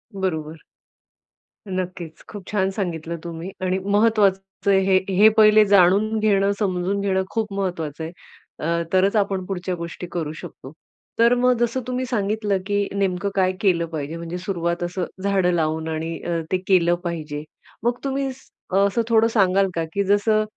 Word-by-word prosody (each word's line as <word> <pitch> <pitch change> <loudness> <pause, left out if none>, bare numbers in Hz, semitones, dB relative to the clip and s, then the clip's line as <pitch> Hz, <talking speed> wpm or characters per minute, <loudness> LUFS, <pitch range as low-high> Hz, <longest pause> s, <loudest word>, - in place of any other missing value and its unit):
बरोबर. 160 -5 -3 1.1
नक्कीच 180 -3 -5
खूप 205 -3 -8
छान 190 -2 +1
सांगितलं 170 -4 -3
तुम्ही 170 +2 -6
आणि 185 0 +1
महत्वाचं 200 -2 +2
आहे 195 - +5
हे, 190 0 +4 0.2
हे 210 +4 +7
पहिले 215 0 +7
जाणून 200 +3 +4
घेणं, 200 -2 +3
समजून 190 -1 0
घेणं 190 -1 +1
खूप 220 -3 -2
महत्वाचं 165 -6 -3
आहे. 160 - -5 0.5
अ, 170 +2 0
तरच 195 +3 +3
आपण 195 -3 0
पुढच्या 185 -1 -3
गोष्टी 170 +1 -7
करू 160 -3 -3
शकतो. 130 -2 -10 0.5
तर 235 +1 +6
मग 250 0 +3
जसं 240 +2 0
तुम्ही 255 0 -2
सांगितलं 210 -3 0
की 205 0 0
नेमकं 195 0 0
काय 185 -1 +3
केलं 175 -4 +2
पाहिजे 155 0 -5
म्हणजे 170 +1 -5
सुरुवात 175 -2 -2
असं 175 0 -2 0.2
झाडं 195 -3 +2
लावून 160 -1 -1
आणि 160 +1 -3
अ, 170 -1 -1
ते 185 - +3
केलं 175 -3 +4
पाहिजे. 155 -3 -4 0.4
मग 240 +1 +1
तुम्ही 270 0 -1
स 265 - -20 0.3
असं 200 +4 +3
अ - - -2
थोडं 225 0 +5
सांगाल 195 -2 +3
का? 165 - 0
की 200 - +1
जसं 205 +2 +2
190 Hz, 165 wpm, -22 LUFS, 170-205 Hz, 1.1 s, हे